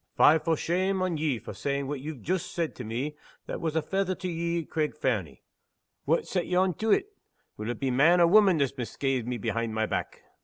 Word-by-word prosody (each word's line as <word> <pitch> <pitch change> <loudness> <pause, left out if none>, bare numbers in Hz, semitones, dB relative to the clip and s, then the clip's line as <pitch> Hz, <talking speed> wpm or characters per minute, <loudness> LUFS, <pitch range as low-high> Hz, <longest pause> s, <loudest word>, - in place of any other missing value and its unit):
Fie 160 +2 +7
for 165 0 0
shame 185 +4 0
on 180 -3 -1
ye 150 -4 0
for 110 - -8
saying 140 0 -2
what 140 0 -3
ye've 140 -4 -7
joost 185 +1 -1
said 170 -2 -1
to 125 - -7
me 125 +7 -3 0.3
that - - -5
was 160 -1 -2
a 160 - +1
fether 190 -1 -1
to 185 0 -5
ye 170 0 -1
at - - -22
Craig 150 -1 -1
Fernie! 100 - -2 0.6
Wha' 165 +3 +3
set 180 -3 -2
ye 180 - -1
on 185 0 +3
to 220 +6 -2
it? 410 - +2 0.4
Will 110 +2 -5
it 120 - -3
be 135 -2 0
man 160 +8 +5
or 170 - +7
woman 195 0 +6
that's 140 -3 +1
misca'ed 125 0 -2
me 125 -1 -2
behind 115 +1 -2
my 110 0 +1
back?" - - -4
155 Hz, 230 wpm, -28 LUFS, 130-180 Hz, 0.6 s, Fie